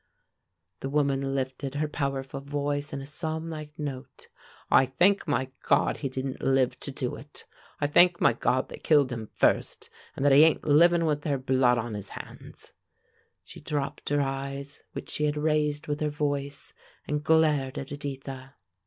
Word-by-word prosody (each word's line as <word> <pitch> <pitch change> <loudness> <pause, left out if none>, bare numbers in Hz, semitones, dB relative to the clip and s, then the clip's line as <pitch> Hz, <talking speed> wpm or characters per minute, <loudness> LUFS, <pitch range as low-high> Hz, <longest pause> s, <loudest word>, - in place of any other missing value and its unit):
The 135 - -4
woman 140 -1 0
lifted 135 +1 -3
her 150 +1 0
powerful 135 -2 -3
voice 145 +1 -2
in 140 - -4
a - - -7
psalmlike 155 0 -5
note. 140 -4 -7 0.4
"I 130 - +6
thank 175 +10 +2
my 130 -2 0
God - - +2
he 135 - -2
didn't 130 0 -4
live 135 -1 +2
to - - -5
do - - -3
it! - - -9 0.3
I - - +1
thank 175 +4 +5
my - - +4
God 125 +2 0
they - - -9
killed 145 -4 +3
him 115 -3 -5
first, - - +1 0.2
and 135 - -2
that 145 - +6
he 140 +3 +8
ain't 160 -1 +3
livin' 165 +3 +5
with 150 -2 0
their 145 -2 0
blood 130 -2 +3
on 115 -1 -3
his 105 -2 -6
hands!" - - -11 0.7
She - - -13
dropped 145 -2 -3
her 145 0 +2
eyes 140 +1 -4
which - - -7
she 150 - 0
had 150 0 0
raised 150 -1 0
with 145 0 -2
her 150 - 0
voice, 145 -1 -3 0.3
and 150 0 -1
glared 150 -4 +2
at 135 - -6
Editha. 135 -1 -7
140 Hz, 170 wpm, -27 LUFS, 135-150 Hz, 0.7 s, he